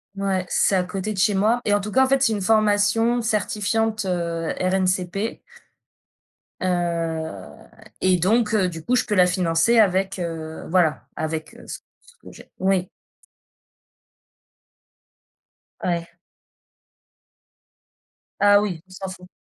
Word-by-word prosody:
Ouais, 195 -2 -1
c'est 195 - +2
à 185 - +2
côté 195 +3 -4
de 195 - -9
chez 205 +2 +3
moi, 215 +5 +2
et 205 - +2
en 205 - +2
tout 210 +1 -6
cas, 265 +3 +4
en - - -2
fait, 270 0 +2
c'est 225 -5 +3
une 205 - -2
formation 220 +3 +2
certifiante, 215 0 -1
heu, 170 -2 -2
RNCP 185 +3 -1 1.2
heu, 165 - -3 0.3
et 185 -1 +3
donc 215 +5 +2
heu, 190 -4 +2
du 165 -2 -8
coup, 250 - +1
je - - +1
peux 210 - -1
la 180 -2 +6
financer 180 +5 +2
avec, 195 -1 +2
heu, 160 -2 -5
voilà, 170 -4 +1
avec 160 0 -4 0.2
ce - - -6 0.3
ce - - -20
que - - -13
j'ai, - - -15
oui. 190 -1 +1 2.9
Ouais. 170 -1 -2 2.3
Ah 205 0 +6
oui, 180 -6 -3
on - - -32
s'en 190 0 -6
fout. 180 -1 -11
190 Hz, 135 wpm, -22 LUFS, 175-210 Hz, 2.9 s, la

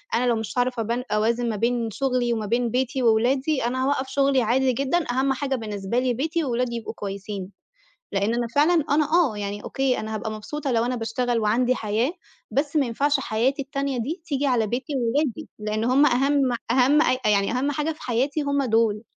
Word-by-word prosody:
أنا 245 - +1
لو 240 - +3
مش 220 +2 -5
عارفة 245 -1 +1
أبا 235 +3 -2
أوازن 230 +3 +1
ما 220 - -2
بين 235 +2 0
شغلي 250 0 0
وما 220 -2 -2
بين 235 +3 0
بيتي 255 +1 -1
وولادي، 260 +5 +2
أنا 260 +2 -1
هاوقّف 270 -1 0
شغلي 275 -1 +2
عادي 255 +3 +2
جدًا، 275 +7 0
أهم 265 +2 +1
حاجة 270 0 -2
بالنسبة 210 -1 -2
لي 250 -1 +1
بيتي 320 +7 -1
وولادي 245 -2 -1
يبقوا 225 -1 -5
كويسين، 200 -2 -6 0.6
لأن 200 +3 +1
أنا 240 0 0
فعلًا 315 +2 +4
أنا 300 +2 +4
آه 325 -10 +3
يعني 205 0 -4
أوكي، 270 -2 0
أنا 220 0 -5
هابقى 220 +1 -3
مبسوطة 260 +6 -4
لو 230 -1 +2
أنا 250 +1 -1
باشتغل 235 +1 -1
وعندي 240 +4 +2
حياة، 225 +5 -1 0.4
بس 285 +2 -1
ما 285 -3 +3
ينفعش 280 +4 +1
حياتي 260 +4 0
التانية 275 -1 -3
دي 310 +10 -4
تيجي 285 -2 -1
على 245 -5 +2
بيتي 255 +8 -3
وولادي، 250 +1 -1
لأن 215 +1 -2
هُم 260 +5 +4
أهم 270 0 +2 0.2
أهم 265 +5 +4
أ 255 - +2
يعني 200 -1 +2
أهم 260 +4 0
حاجة 300 +3 -1
في 310 - -15
حياتي 265 +5 0
هُم 280 -1 0
دول. 225 -3 +2
250 Hz, 195 wpm, -24 LUFS, 225-275 Hz, 0.6 s, فعلًا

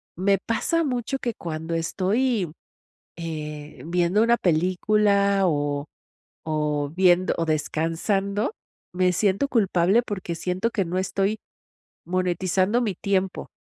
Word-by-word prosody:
me 195 +2 +2
pasa 330 +8 0
mucho 255 -1 -2
que 240 -2 -2
cuando 160 -2 -5
estoy, 195 +3 0 0.7
eh, 150 -3 -6
viendo 175 +4 +2
una 235 +1 +4
película 200 +3 +2
o 145 -3 -1 0.6
o 150 -2 -1
viendo 185 -1 +4
o 165 - 0
descansando, 185 - -1 0.4
me 180 0 +2
siento 200 +8 +1
culpable 200 -2 +3
porque 190 -5 -4
siento 180 +6 -1
que 200 -5 -1
no 180 +2 -1
estoy 195 +3 -1 0.7
monetizando 185 +5 +1
mi 205 -6 -1
tiempo, 190 -1 -1
185 Hz, 115 wpm, -24 LUFS, 165-205 Hz, 0.7 s, una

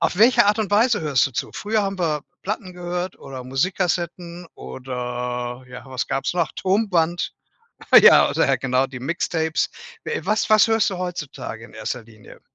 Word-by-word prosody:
auf - - 0
welche 230 -1 +6
Art 210 +2 +3
und 210 -3 -2
Weise 225 +2 +3
hörst 145 -5 +2
du - - -16
zu? 120 - -4
Früher 215 0 0
haben 195 -1 -4
wir 155 -4 0 0.2
Platten 195 -2 -4
gehört 180 +1 -4
oder 130 -2 -8
Musikkassetten 175 +4 -2
oder 125 -1 -5
ja, 125 +1 -10
was 130 -1 -4
gab's 135 +5 -1
noch, 170 -2 0
Tonband. 185 -4 0 0.7
Ja, - - +7
oder, - - +2
genau, 130 0 +1
die 130 -2 -9
Mixtapes. 160 +2 -1 0.4
We 465 +1 -3
was 215 +1 0
was 215 +1 +5
hörst 225 -1 +3
du 190 - -4
heutzutage 145 -10 -6
in 115 - -15
erster 110 +2 -5
Linie? 110 -2 -16
170 Hz, 165 wpm, -22 LUFS, 130-190 Hz, 0.7 s, Ja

